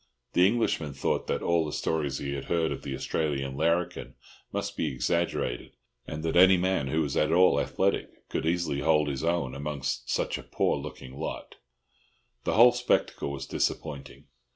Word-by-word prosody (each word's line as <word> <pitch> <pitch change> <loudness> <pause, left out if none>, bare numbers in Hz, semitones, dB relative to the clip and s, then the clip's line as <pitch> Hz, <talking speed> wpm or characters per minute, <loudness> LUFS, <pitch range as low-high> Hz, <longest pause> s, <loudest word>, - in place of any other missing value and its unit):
The 90 +1 +6
Englishman 90 - 0
thought 70 - -1
that - - -1
all 85 -1 +2
the 75 - -4
stories 75 -3 -1
he 70 0 -4
had 70 -1 -5
heard 85 -2 0
of - - -4
the 70 - -4
Australian 70 -2 -2
larrikin 85 +4 0 0.4
must - - -3
be - - -1
exaggerated, 65 -3 -1 0.3
and 75 +1 -5
that 80 - -1
any 95 +1 +7
man 90 -5 0
who 80 +4 +1
was 70 -1 -3
at 75 +1 +2
all 90 +2 +5
athletic 100 +1 -1
could - - -2
easily 85 -4 0
hold 75 0 +3
his 70 0 -3
own 85 -6 0
among 70 0 -5
such 60 -2 -1
a - - -10
poor - - 0
looking 65 +1 -8
lot. 80 - -6 0.9
The - - +1
whole 120 +2 +8
spectacle 120 -11 0
was 70 -1 -5
disappointing. 70 -1 -3
75 Hz, 175 wpm, -28 LUFS, 70-85 Hz, 0.9 s, whole